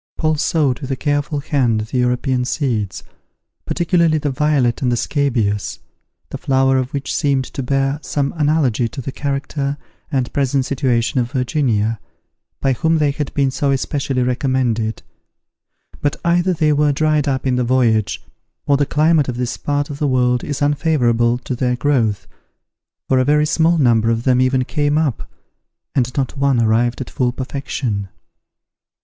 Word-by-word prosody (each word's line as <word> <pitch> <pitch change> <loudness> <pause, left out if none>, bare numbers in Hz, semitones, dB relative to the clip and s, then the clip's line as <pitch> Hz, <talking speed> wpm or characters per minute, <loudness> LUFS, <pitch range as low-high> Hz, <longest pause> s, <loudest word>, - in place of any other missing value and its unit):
Paul 155 -1 +1
sowed 145 -6 +1
with 135 - -7
a 135 - 0
careful 145 +1 -1
hand 125 -7 +1
the 110 +4 -3
European 125 +1 +1
seeds, 125 -7 -2 0.6
particularly 170 -2 +2
the 145 -2 -1
violet 135 -4 +1
and 125 -2 +1
the 120 - +1
scabious, 115 -8 -1 0.5
the - - -5
flowers 135 0 +2
of 130 - -6
which 140 -1 -3
seemed 135 -2 +1
to 135 - -6
bear 135 +2 0
some 140 -2 -2
analogy 145 -7 +1
to 135 - -9
the 135 +1 -4
character 140 0 -3 0.3
and 130 -4 -1
present 135 -1 +1
situation 130 -1 0
of 120 -1 -1
Virginia, 120 -5 0 0.6
by 135 - +2
whom 160 +6 +1
they 150 -2 +2
had 145 0 -4
been 140 -2 +2
so 140 +2 -1
especially 135 -1 -1
recommended; 125 -3 -1 1.0
but 145 - 0
either 175 +2 +2
they 155 -2 +2
were 150 0 +3
dried 155 0 +1
up 135 -1 -1
in 130 -1 +1
the 125 - +1
voyage, 120 -4 +1 0.4
or 140 - +3
the 145 0 +1
climate 155 -2 +2
of 120 - -4
this 125 -1 -2
part 145 0 -2
of 140 - -7
the 150 - +1
world 125 -2 +1
is 145 -1 -3
unfavourable 125 -6 +2
to 125 +1 -5
their 125 0 0
growth, 120 -6 0 0.8
for 130 - +3
a - - +3
very 150 +2 +3
small 165 +2 +2
number 115 -6 +3
of 115 0 0
them 125 -1 +3
even 130 0 +2
came 145 +1 0
up, 150 -7 -1 0.6
and 125 -2 +1
not 135 -1 -1
one 140 -3 +2
arrived 115 +2 +1
at 125 - -6
full 125 -2 0
perfection. 130 -6 -4
135 Hz, 165 wpm, -19 LUFS, 125-145 Hz, 1.0 s, were